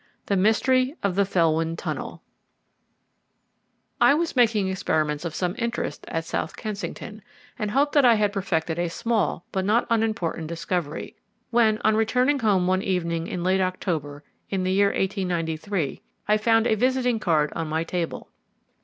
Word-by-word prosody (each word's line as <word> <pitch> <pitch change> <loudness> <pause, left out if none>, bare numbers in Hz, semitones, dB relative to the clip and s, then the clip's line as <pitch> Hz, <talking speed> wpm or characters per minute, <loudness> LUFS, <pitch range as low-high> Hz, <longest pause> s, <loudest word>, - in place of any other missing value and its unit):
III - - -37
THE 200 - +1
MYSTERY 255 - +2
OF 200 -2 +1
THE 200 +2 +2
FELWYN 165 -3 +1
TUNNEL - - -5 1.8
I 280 - +6
was 330 0 -1
making 220 -5 +3
experiments 155 -5 -1
of 160 -2 -4
some 180 0 -1
interest 235 0 -3
at 165 0 -3
South - - -3
Kensington, 215 0 -6 0.4
and 210 -2 -1
hoped 280 +6 +1
that 285 - +5
I 240 -2 +6
had 210 -1 +1
perfected 175 -4 -1
a 175 -1 0
small 215 -2 -1
but 190 - -1
not 215 +5 +2
unimportant 215 -8 0
discovery, 170 -1 -4 0.3
when, 225 -2 +4
on 215 0 +4
returning 250 +6 +2
home 200 -6 +2
one 185 +1 +2
evening 170 -3 -1
in 175 - -4
late 190 +1 +2
October 160 -6 -3 0.3
in 190 -2 -1
the 185 - 0
year 200 +1 +4
1893, 180 -4 -2 0.3
I 210 - +4
found 225 +1 +3
a 220 - +3
visiting 250 +1 +1
card 155 -7 +1
on 165 -1 -2
my 160 +1 0
table. 170 -1 -4
195 Hz, 160 wpm, -24 LUFS, 170-220 Hz, 1.8 s, I